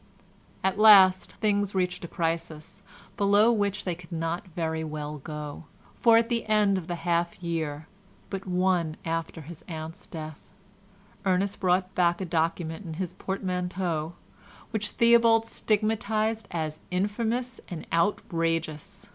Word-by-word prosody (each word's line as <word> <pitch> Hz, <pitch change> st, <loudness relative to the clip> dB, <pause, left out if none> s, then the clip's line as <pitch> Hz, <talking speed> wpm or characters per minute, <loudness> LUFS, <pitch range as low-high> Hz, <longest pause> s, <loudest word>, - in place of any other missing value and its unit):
At 190 Hz, +1 st, 0 dB
last 195 Hz, -4 st, +7 dB
things 205 Hz, -2 st, 0 dB
reached 180 Hz, 0 st, -1 dB
a -, -, -4 dB
crisis, 165 Hz, +1 st, -3 dB, 0.4 s
below 205 Hz, +2 st, +5 dB
which 205 Hz, -2 st, 0 dB
they 180 Hz, -, 0 dB
could 170 Hz, +1 st, -13 dB
not 165 Hz, +3 st, -3 dB
very 160 Hz, -2 st, -2 dB
well 150 Hz, -1 st, -5 dB
go, 150 Hz, +2 st, -7 dB, 0.3 s
for 230 Hz, -1 st, +6 dB
at 230 Hz, 0 st, +3 dB
the 235 Hz, -2 st, 0 dB
end 210 Hz, -3 st, +3 dB
of 170 Hz, -, -10 dB
the 175 Hz, -, -2 dB
half 170 Hz, 0 st, 0 dB
year 160 Hz, -3 st, -3 dB, 0.5 s
but 195 Hz, -1 st, -5 dB
one 180 Hz, -3 st, +1 dB
after 165 Hz, 0 st, -3 dB
his 160 Hz, +2 st, -10 dB
aunt's 160 Hz, -1 st, -7 dB
death, 155 Hz, -2 st, -9 dB, 0.7 s
Ernest 195 Hz, +1 st, +1 dB
brought 185 Hz, 0 st, +1 dB
back 175 Hz, -1 st, +2 dB
a 190 Hz, -, -3 dB
document 165 Hz, +1 st, -1 dB
in 165 Hz, -4 st, -6 dB
his 180 Hz, 0 st, -4 dB
portmanteau, 180 Hz, -4 st, -2 dB, 0.6 s
which 210 Hz, -2 st, -1 dB
Theobald 230 Hz, -1 st, +5 dB
stigmatised 220 Hz, 0 st, 0 dB
as 155 Hz, -2 st, -3 dB
"infamous 225 Hz, +6 st, -1 dB
and 170 Hz, -3 st, -7 dB
outrageous." 165 Hz, +1 st, -1 dB
180 Hz, 135 wpm, -27 LUFS, 165-205 Hz, 0.7 s, last